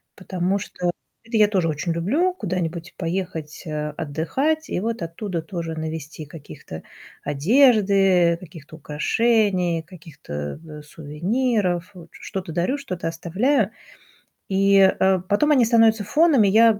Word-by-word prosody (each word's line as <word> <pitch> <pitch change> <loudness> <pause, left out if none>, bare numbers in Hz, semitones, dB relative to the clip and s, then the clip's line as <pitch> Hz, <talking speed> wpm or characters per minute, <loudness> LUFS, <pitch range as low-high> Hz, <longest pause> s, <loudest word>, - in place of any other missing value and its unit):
Потому 185 0 -1
что 180 -2 -3 0.3
это 230 0 -2
я 210 -1 +6
тоже 190 -5 +1
очень 155 +3 -2
люблю 290 - +1
куда-нибудь 175 - -4
поехать, 165 -3 -4
э, 150 0 -3
отдыхать 265 - -1
и - - 0
вот 225 0 -3
оттуда 170 +1 -4
тоже 165 -2 -5
навезти 160 -1 -6
каких-то 145 - -10 0.4
одежды, 195 - +4
каких-то 160 -3 -12
украшений, 180 +2 +1
каких-то, 150 - -8
э, 150 -1 -9
сувениров. 180 - -1
Вот 170 -2 -12
что-то 185 -4 -7
дарю, 180 - 0
что-то 185 -12 -5
оставляю. 195 - 0 0.8
И, 195 +1 +3 0.2
э, 190 -1 +3
потом 255 +10 +2
они 255 -5 +5
становятся 225 -2 +4
фоном, 300 - +4
и - - +4
я 220 +1 +5
185 Hz, 130 wpm, -22 LUFS, 160-220 Hz, 0.8 s, я